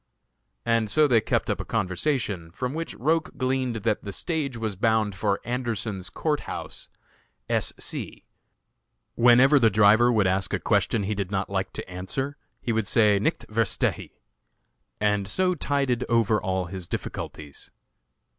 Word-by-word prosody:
And 115 -2 +1
so 155 +4 +4
they 120 -5 +4
kept - - 0
up - - -1
a - - -2
conversation, 95 - -1
from 125 +9 -4
which 165 +1 -4
Roch 160 +5 0
gleaned 130 -2 0
that 110 -2 0
the 100 - -5
stage 145 - -2
was 110 -3 -3
bound 110 0 +1
for 100 0 0
Anderson's 115 -6 -3
Court 150 -2 -1
House, - - -7 0.6
S. - - 0
C. - - -5 0.9
Whenever 125 +4 +6
the 115 -3 +5
driver 110 +4 +5
would 110 -4 +3
ask 95 +1 0
a - - -3
question 110 - +1
he 105 +2 -1
did 100 -3 -3
not 95 -1 -2
like 95 -1 -1
to - - -6
answer, 95 +10 -4 0.3
he 115 - 0
would 110 -2 0
say, 105 -3 +4
"nichts 100 - -1
verstehe," 110 -1 0 0.9
and 105 -2 +1
so 185 - +1
tided 140 -6 0
over 115 -2 +2
all 95 -1 -1
his 90 -1 -6
difficulties. 75 -2 -6
110 Hz, 155 wpm, -25 LUFS, 100-130 Hz, 0.9 s, Whenever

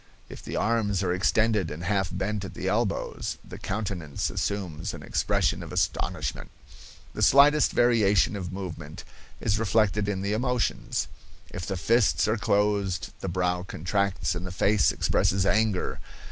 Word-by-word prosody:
If - - -9
the - - -6
arms 105 -4 +1
are 90 -1 +1
extended 105 0 +2
and 80 +2 -7
half 95 0 0
bent 95 +2 -2
at 95 - -8
the 95 - -4
elbows, 105 +1 -1
the - - -9
countenance 95 -8 -3
assumes 90 -7 -3
an - - -10
expression - - 0
of - - -8
astonishment. - - -2 0.6
The - - -5
slightest 140 +7 +6
variation 110 -5 +3
of 90 -3 -5
movement 85 -5 -7 0.4
is 105 0 0
reflected 105 -1 +2
in 95 -1 -2
the 100 +1 0
emotions. 125 +1 -1 0.4
If 90 - -6
the 95 - -2
fists 115 +3 +3
are 110 - +2
closed, 100 -4 0
the 95 - -4
brow 90 0 0
contracts 95 +1 -1
and 90 0 -5
the 90 - -5
face 95 - +3
expresses 95 0 +1
anger. 105 -2 +1
100 Hz, 150 wpm, -27 LUFS, 90-105 Hz, 0.6 s, slightest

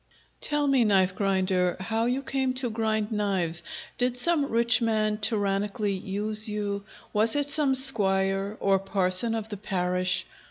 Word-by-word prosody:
Tell 295 -1 0
me, 270 -3 +2
Knife 190 -3 +1
grinder, 190 -2 -1
how 225 +4 -2
you 260 +3 -2
came 265 -1 -2
to 255 -2 -2
grind 220 -1 -2
knives? 190 -6 0 0.4
Did 250 0 -1
some 295 +1 +2
rich 235 +1 +2
man 215 -2 -1
tyrannically 205 0 -1
use 210 +3 +1
you? 205 -1 -4 0.3
Was 220 +3 +2
it 290 0 -1
some 290 -3 +1
squire? 195 -5 +4
or 195 -1 +1
parson 195 +3 +2
of 220 -1 -6
the 205 - -7
parish? 180 -2 -1
210 Hz, 150 wpm, -25 LUFS, 195-235 Hz, 0.4 s, squire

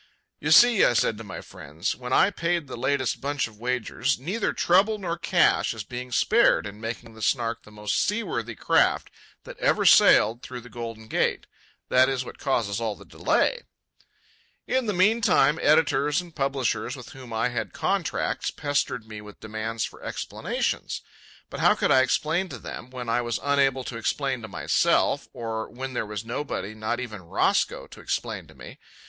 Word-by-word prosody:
"You - - -2
see," 240 -4 +7
I - - +5
said 115 -2 +1
to - - -7
my 95 -6 -7
friends, 75 +4 -5
when 125 0 -8
I 200 - +5
paid 170 -3 -1
the 130 - -7
latest 130 +1 -1
bunch 140 -1 -1
of 105 -2 -17
wagers, 125 +2 -1
"neither 185 - -2
trouble 195 +5 +3
nor 175 -4 -3
cash 170 -7 +2
is 110 - -5
being 125 +3 -7
spared 230 - +3
in 105 +1 -8
making 115 0 -6
the 110 - -13
Snark 115 0 0
the 105 - -17
most 105 0 -1
seaworthy 170 - -2
craft - - +2 0.3
that - - -11
ever - - +2
sailed 110 +3 +6
out - - -32
through 125 -1 -8
the 125 +1 -14
Golden 115 -2 -7
Gate—that 130 +3 0
is 130 -2 -2
what - - -10
causes 115 -6 -1
all 110 -2 -1
the - - -15
delay." - - +1 1.0
In 255 -2 0
the 210 - +1
meantime 185 -6 +3
editors 150 -1 +3
and 175 -2 -9
publishers 135 -4 -1
with 125 -3 -10
whom 130 -3 -11
I 115 +2 0
had 110 -5 -3
contracts - - -1
pestered 140 -5 -2
me 105 -1 -8
with 105 0 -13
demands 110 +1 -3
for - - -11
explanations. - - -3 0.5
But - - -6
how - - +5
could - - +1
I 130 - +6
explain 160 +8 0
to 135 - -7
them, 120 +1 -8
when 125 -2 -7
I 115 +1 +1
was 120 -1 -2
unable 135 -2 +2
to 125 - -6
explain 130 +2 -1
to 110 - -7
myself, - - +1
or 110 -1 -4
when 130 +1 -6
there 115 - -2
was 105 +1 -5
nobody, 115 -5 -4
not 110 +2 -3
even 110 -6 -6
Roscoe, 85 - 0
to - - -13
explain - - -3
to - - -17
me? - - -12
125 Hz, 180 wpm, -25 LUFS, 110-145 Hz, 1.0 s, see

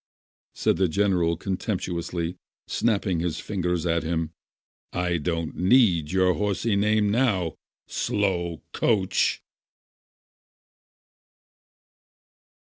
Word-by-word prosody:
said - - +1
the 95 - +3
general 90 -2 +1
contemptuously, 90 -3 -3 0.3
snapping 100 -6 0
his 85 -1 -2
fingers 90 -4 -2
at 85 -1 +1
him. 80 0 -2 0.6
"I 90 -1 0
don't 80 0 -2
need 90 - +4
your 95 -1 +3
horsey 105 +2 0
name 105 0 +2
now! 105 -8 +1 0.3
Slow 85 -5 -1
coach 100 -5 +1
90 Hz, 85 wpm, -25 LUFS, 85-100 Hz, 0.6 s, need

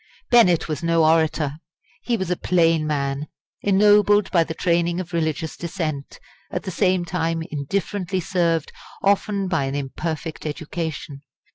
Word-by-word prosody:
Bennett 185 -9 +5
was 155 -2 -3
no 165 -1 +3
orator. 155 -2 +2 0.4
He 240 -2 0
was 190 -3 -3
a - - +2
plain 165 -3 +2
man, 140 0 -2 0.3
ennobled 205 0 +4
by 170 -3 +4
the 160 0 -6
training 170 +1 +1
of 180 -1 -6
religious 160 -1 -1
dissent, 160 -5 -4 0.3
at - - -4
the 190 - -4
same 185 -1 +1
time 165 -1 -1
indifferently 185 +5 -2
served 170 -3 0 0.3
often 200 0 +1
by 165 -6 0
an 135 +1 -3
imperfect 155 +3 -4
education. 155 -2 -5
165 Hz, 140 wpm, -22 LUFS, 155-185 Hz, 0.4 s, Bennett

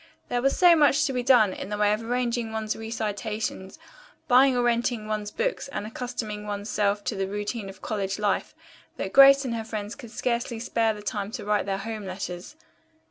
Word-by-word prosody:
There 245 0 0
was 275 +2 +1
so 355 -2 +7
much 300 -1 +4
to 270 - -1
be 250 - 0
done 240 -6 +5
in - - -7
the 210 - -3
way 210 0 +3
of 215 - -2
arranging 240 -1 -1
one's 220 -1 -2
recitations, 215 -3 -4 0.5
buying 260 +1 +5
or 245 - +2
renting 235 -2 0
one's 210 -1 -2
books - - -2
and 275 -6 -5
accustoming 220 -2 -5
one's 205 +1 -4
self 205 0 +1
to 220 - -2
the 195 -1 -2
routine 205 +1 -4
of 190 -1 -13
college 195 -3 -2
life 205 -2 -1 0.4
that - - -4
Grace 275 0 +8
and 245 - -2
her 225 -1 -3
friends 215 -1 -5
could 245 -5 -11
scarcely 235 0 -2
spare 225 -1 0
the 210 - -10
time 205 -1 -3
to 215 -6 -5
write 210 -1 +1
their 195 -1 -1
home 215 0 -5
letters. 185 +5 -6
220 Hz, 200 wpm, -26 LUFS, 205-245 Hz, 0.5 s, Grace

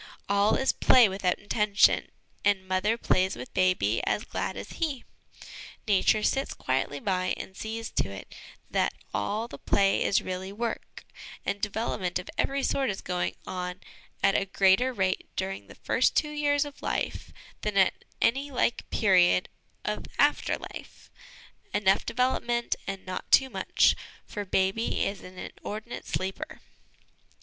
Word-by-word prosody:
All 200 +2 +3
is 265 - +2
play 250 -3 +6
without 190 -2 0
intention, 205 0 +3 0.3
and 200 -2 +2
mother 190 +5 +1
plays 190 -4 +2
with 125 +1 -9
baby 185 - +2
as 210 - +1
glad - - -3
as - - -7
he. 300 -7 -1 0.8
Nature 210 +1 +3
sits 270 +4 0
quietly 135 +2 -1
by 185 0 0
and 190 - -8
sees 225 +2 -5
to - - 0
it 100 0 -9 0.4
that - - +1 0.2
all 215 - -1
the - - -10
play 195 -1 +2
is 195 - +3
really 185 +1 -4
work; 230 +3 -5 0.4
and 200 0 -2
development 205 -4 -1
of 180 - -7
every 275 0 0
sort 270 -3 +1
is 195 - -3
going 180 -1 -2
on 180 0 -4 0.4
at 195 - +5
a 195 - +2
greater 195 +6 +4
rate 190 -6 -1
during 190 +1 -3
the - - -13
first - - +1
two 300 -2 +2
years 290 -1 +2
of 290 -1 -10
life - - -2 0.3
than 210 -1 -2
at 190 - +3 0.2
any 275 +5 +2
like 245 -3 0
period 180 - +4 0.4
of - - -2
after - - +3
life - - -11 0.6
enough 195 -2 +3
development 240 -1 0
and 195 -1 -5
not 185 0 -6
too 265 -1 +6
much, 190 -3 +3 0.3
for 205 -1 -5
baby 190 +4 +1
is 195 -1 -3
an 185 0 -12
inordinate 215 +5 -7
sleeper. 190 +1 -3
200 Hz, 150 wpm, -28 LUFS, 185-230 Hz, 0.8 s, play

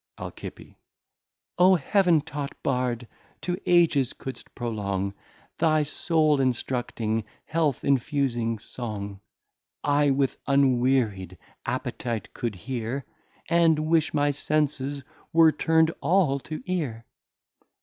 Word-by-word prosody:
Al. - - -6 1.3
O 185 +1 +7
Heaven 175 +1 +3
taught 145 -2 -6
Bard! 125 -3 -1 0.3
to 175 - -1
Ages 160 -7 +4
couldst 130 - -9
prolong 100 -5 -2 0.5
Thy 155 -2 +3
Soul 155 -1 +2
instructing, 120 -3 -1 0.2
Health 155 -5 0
infusing 130 -4 +1
Song, 105 -3 -6 0.6
I 145 0 +3
with 135 -1 +1
unweary'd 125 -9 +2 0.3
Appetite 115 -5 -3
could 115 -5 -3
hear, 125 +5 -4 0.4
And 165 -1 +4
wish 160 0 +2
my 145 -1 +2
Senses 145 -1 -1 0.3
were 165 -1 +6
turn'd 160 +1 +2
all 150 -2 +3
to 155 +3 -7
Ear. 145 -11 -3
140 Hz, 100 wpm, -26 LUFS, 120-155 Hz, 1.3 s, O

